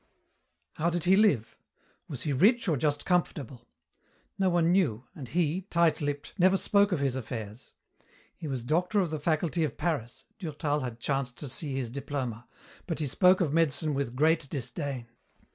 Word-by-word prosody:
How 165 Hz, +2 st, +1 dB
did 175 Hz, -1 st, -2 dB
he 185 Hz, +2 st, +5 dB
live? 195 Hz, -, +3 dB, 0.5 s
Was 135 Hz, -6 st, -6 dB
he 145 Hz, -, -1 dB
rich 220 Hz, -, +4 dB
or 165 Hz, -, +3 dB
just 145 Hz, +1 st, 0 dB
comfortable? 145 Hz, -8 st, -1 dB, 0.7 s
No 190 Hz, -1 st, +3 dB
one 170 Hz, -1 st, +3 dB
knew, 145 Hz, -, +2 dB
and 140 Hz, -5 st, -8 dB
he, 170 Hz, +4 st, 0 dB
tight 170 Hz, -2 st, +2 dB
lipped, 145 Hz, -1 st, -3 dB
never 185 Hz, +2 st, +5 dB
spoke 200 Hz, +1 st, +3 dB
of 180 Hz, -, +1 dB
his 135 Hz, -2 st, 0 dB
affairs. 110 Hz, -3 st, -7 dB, 0.6 s
He 155 Hz, -, -7 dB
was 130 Hz, -4 st, -3 dB
doctor 180 Hz, -, +1 dB
of 175 Hz, -4 st, -2 dB
the 155 Hz, -, -2 dB
Faculty 160 Hz, +2 st, 0 dB
of 150 Hz, -3 st, -2 dB
Paris 140 Hz, -9 st, -3 dB
Durtal 150 Hz, -3 st, -2 dB
had 125 Hz, -4 st, -5 dB
chanced 135 Hz, -1 st, -2 dB
to 145 Hz, -, -5 dB
see 135 Hz, +2 st, -3 dB
his 125 Hz, -4 st, -3 dB
diploma 130 Hz, -4 st, -4 dB, 0.4 s
but 165 Hz, -, -2 dB
he 155 Hz, -, -1 dB
spoke 180 Hz, +7 st, +4 dB
of 150 Hz, -5 st, +1 dB
medicine 155 Hz, -1 st, +2 dB
with 135 Hz, -3 st, -2 dB
great 155 Hz, +1 st, +2 dB
disdain. 130 Hz, 0 st, -4 dB
150 Hz, 175 wpm, -29 LUFS, 130-170 Hz, 0.7 s, he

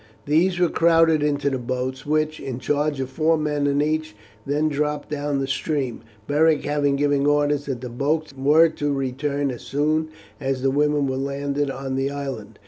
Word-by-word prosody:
These 170 Hz, +5 st, +2 dB
were 175 Hz, -, +4 dB
crowded 165 Hz, -2 st, +4 dB
into 145 Hz, -1 st, 0 dB
the 130 Hz, -, -1 dB
boats, 130 Hz, +2 st, -4 dB
which, 155 Hz, 0 st, 0 dB
in 130 Hz, -3 st, -5 dB
charge 145 Hz, +2 st, -1 dB
of 130 Hz, -, -2 dB
four 160 Hz, +3 st, +2 dB
men 150 Hz, -2 st, 0 dB
in 140 Hz, +1 st, +2 dB
each, 155 Hz, -6 st, -2 dB, 0.3 s
then 150 Hz, +2 st, +1 dB
dropped 150 Hz, 0 st, -2 dB
down 145 Hz, -1 st, -1 dB
the 135 Hz, -, -1 dB
stream, 135 Hz, -3 st, -2 dB, 0.2 s
Beric 155 Hz, +2 st, +3 dB
having 145 Hz, -1 st, +1 dB
given 145 Hz, 0 st, +1 dB
orders 145 Hz, -1 st, +1 dB
that 130 Hz, -4 st, -3 dB
the 125 Hz, -, -5 dB
boats 150 Hz, +5 st, -1 dB
were 150 Hz, +5 st, +5 dB
to 145 Hz, -2 st, -2 dB
return 140 Hz, +1 st, -1 dB
as 120 Hz, -, -8 dB
soon 155 Hz, +2 st, 0 dB, 0.3 s
as 135 Hz, -2 st, -2 dB
the 135 Hz, -, +3 dB
women 145 Hz, 0 st, +2 dB
were 130 Hz, -1 st, -2 dB
landed 140 Hz, +1 st, -2 dB
on 135 Hz, 0 st, -4 dB
the 135 Hz, +1 st, 0 dB
island. 130 Hz, -7 st, -6 dB
145 Hz, 185 wpm, -23 LUFS, 135-150 Hz, 0.3 s, were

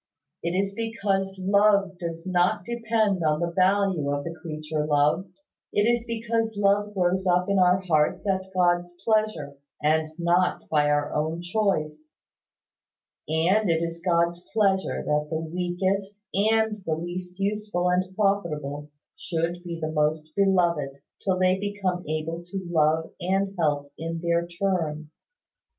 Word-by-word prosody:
It 170 Hz, -, -2 dB
is 195 Hz, 0 st, -1 dB
because 200 Hz, -3 st, -1 dB
love 200 Hz, -1 st, +3 dB
does 165 Hz, -1 st, -5 dB
not 180 Hz, -1 st, +1 dB
depend 220 Hz, -5 st, 0 dB
on 155 Hz, -1 st, +2 dB
the 170 Hz, 0 st, -1 dB
value 185 Hz, -4 st, +2 dB
of 145 Hz, 0 st, -1 dB
the 170 Hz, -, -5 dB
creature 155 Hz, -1 st, -3 dB
loved 150 Hz, +5 st, +1 dB, 0.4 s
it 205 Hz, -, +2 dB
is 235 Hz, +1 st, +2 dB
because 225 Hz, -1 st, -1 dB
love 205 Hz, +1 st, +2 dB
grows 185 Hz, 0 st, +1 dB
up 180 Hz, +1 st, +3 dB
in 200 Hz, -1 st, +2 dB
our 180 Hz, +1 st, +4 dB
hearts 160 Hz, +1 st, +1 dB
at 190 Hz, -1 st, -1 dB
God's 175 Hz, -1 st, +1 dB
pleasure, 215 Hz, -11 st, 0 dB, 0.2 s
and 155 Hz, +1 st, +2 dB
not 175 Hz, +1 st, +1 dB
by 150 Hz, -1 st, +3 dB
our 145 Hz, 0 st, +1 dB
own 160 Hz, +3 st, -1 dB
choice; 155 Hz, -6 st, -1 dB, 1.1 s
and 180 Hz, +6 st, +2 dB
it 165 Hz, 0 st, +2 dB
is 170 Hz, 0 st, -4 dB
God's 170 Hz, 0 st, +1 dB
pleasure 195 Hz, -3 st, +1 dB
that 150 Hz, 0 st, 0 dB
the 160 Hz, -, -1 dB
weakest 180 Hz, +4 st, -2 dB, 0.2 s
and 215 Hz, 0 st, +2 dB
the 160 Hz, -3 st, -1 dB
least 180 Hz, +2 st, -6 dB
useful 200 Hz, -3 st, -1 dB
and 185 Hz, +1 st, 0 dB
profitable 150 Hz, -8 st, -1 dB, 0.3 s
should 170 Hz, +1 st, -2 dB
be 170 Hz, -1 st, -5 dB
the 155 Hz, -1 st, -3 dB
most 155 Hz, 0 st, 0 dB
beloved, 175 Hz, -8 st, +2 dB, 0.3 s
till 190 Hz, -2 st, +1 dB
they 185 Hz, 0 st, +3 dB
become 195 Hz, -3 st, -2 dB
able 155 Hz, +2 st, -3 dB
to 190 Hz, +1 st, -6 dB
love 160 Hz, 0 st, +2 dB
and 195 Hz, +2 st, 0 dB
help 145 Hz, -3 st, 0 dB
in 165 Hz, +1 st, -3 dB
their 170 Hz, 0 st, 0 dB
turn. 170 Hz, -4 st, -2 dB
180 Hz, 145 wpm, -26 LUFS, 160-195 Hz, 1.1 s, our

